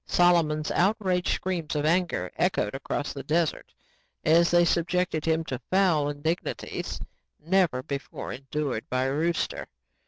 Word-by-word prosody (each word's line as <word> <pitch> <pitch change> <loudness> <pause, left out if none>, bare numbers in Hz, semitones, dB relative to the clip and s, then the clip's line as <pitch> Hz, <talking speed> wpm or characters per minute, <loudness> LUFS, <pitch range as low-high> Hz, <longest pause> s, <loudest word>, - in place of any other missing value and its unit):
Solomon's 165 -4 +3
outraged 190 -2 +1
screams 175 -5 -3
of 150 0 0
anger 160 - +1
echoed 105 - 0
across 140 +2 -3
the 140 - -6
desert 155 +3 -1 0.5
as 170 +2 +5
they 175 0 +5
subjected 170 -1 0
him 160 0 +1
to 130 -6 -5
fowl 175 -7 +3
indignities 155 +4 -3 0.4
never 165 -6 +1
before 140 -1 -5
endured 135 -2 -4
by 130 0 +1
a 135 +1 0
rooster. 165 +3 -1
160 Hz, 130 wpm, -27 LUFS, 145-175 Hz, 0.5 s, as